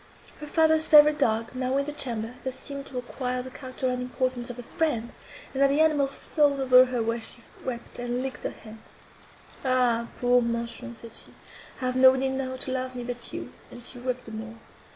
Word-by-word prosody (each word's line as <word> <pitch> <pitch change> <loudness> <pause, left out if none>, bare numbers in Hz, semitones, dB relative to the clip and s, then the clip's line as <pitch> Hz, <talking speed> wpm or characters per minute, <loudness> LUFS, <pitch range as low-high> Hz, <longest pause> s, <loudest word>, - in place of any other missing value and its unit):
Her 300 - -7
father's 315 0 +4
favourite 300 0 +7
dog, 225 -3 +1
now 255 +1 0
in 280 - +1
the 295 - -5
chamber, 235 -5 -2
thus 260 0 -4
seemed 280 -1 -4
to 260 - -7
acquire 250 0 -3
the 260 - -9
character 260 0 -4
and 250 0 -1
importance 250 -1 -2
of 245 - -6
a 245 - -7
friend; 235 -4 -1 0.4
and, 270 - -1
as 275 - +6
the 280 +2 +2
animal 305 -3 +4
fawned 280 0 +1
over 255 -1 +7
her 250 -2 -1
when 230 +1 -1
she 235 +1 -7 0.2
wept, 240 -2 -6
and 245 +1 -2
licked 265 -1 -5
her - - -1
hands, 220 0 -14 0.6
"Ah, 250 -3 +2
poor 245 0 +4
Manchon!" 235 +1 -3
said 230 0 -11
she, - - -6 0.5
"I - - -1
have 255 0 0
nobody 260 +1 +6
now 265 -1 -2
to 260 0 -4
love 255 0 -3
me—but 245 -1 -5
you!" - - -6 0.2
and - - -10
she 245 +1 -4
wept 250 0 -3
the 225 - -9
more. 220 +1 -7
255 Hz, 205 wpm, -27 LUFS, 240-270 Hz, 0.6 s, favourite